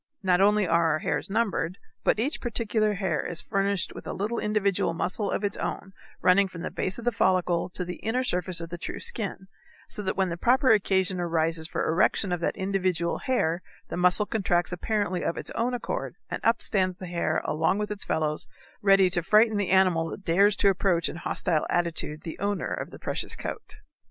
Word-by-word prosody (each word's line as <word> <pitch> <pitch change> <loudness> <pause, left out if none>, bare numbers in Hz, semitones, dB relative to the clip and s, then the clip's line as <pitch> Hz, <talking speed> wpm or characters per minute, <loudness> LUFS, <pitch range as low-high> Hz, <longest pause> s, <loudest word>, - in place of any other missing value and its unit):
Not 180 -1 +3
only 205 0 +4
are 165 -2 +3
our - - +1
hairs - - -2
numbered, 195 -5 0 0.3
but - - +3
each 275 +7 -1
particular 220 -3 0
hair 190 -6 -1
is 170 -2 -3
furnished 195 -1 0
with - - -9
a - - -3
little 210 +5 -2
individual 200 -5 0
muscle 195 +4 -1
of - - -2
its 200 -1 -1
own 190 - -4 0.3
running 195 +2 +5
from 180 -2 -9
the - - -4
base 185 - 0
of 235 - -8
the 245 - +3
follicle 180 -4 +1
to 180 0 -3
the 180 0 -6
inner 245 +4 -1
surface 180 -6 -1
of 165 0 -7
the 175 - -6
true - - -5
skin, 195 -3 -4 0.4
so - - -5
that 190 -2 -2
when 190 -1 +2
the 170 - -4
proper 255 - +4
occasion 190 -3 +2
arises 165 -1 0
for - - -2
erection 180 +3 +2
of 175 - 0
that 170 - -1
individual 185 -3 0
hair 175 -10 0 0.3
the - - -4
muscle 180 +4 +3
contracts 180 -5 0
apparently 195 0 -1
of 170 - -1
its - - -4
own 245 +2 -1
accord, - - -4 0.2
and - - -3
up 230 +1 +2
stands 185 -3 +1
the 185 - -7
hair 170 -3 0
along 160 +5 +1
with 210 0 -3
its 205 -2 -3
fellows, 155 -1 -1 0.3
ready 195 -1 +5
to 180 -1 +1
frighten 215 +5 +4
the 205 -2 -1
animal 185 -4 +3
that 195 - -8
dares 195 +4 +4
to 200 - +4
approach 180 -3 +1
in - - -7
hostile 170 -2 -1
attitude 165 -3 -1
the 165 - -7
owner 200 0 -1
of - - -4
the - - -11
precious - - -1
coat. 430 0 -7
190 Hz, 205 wpm, -27 LUFS, 175-210 Hz, 0.4 s, running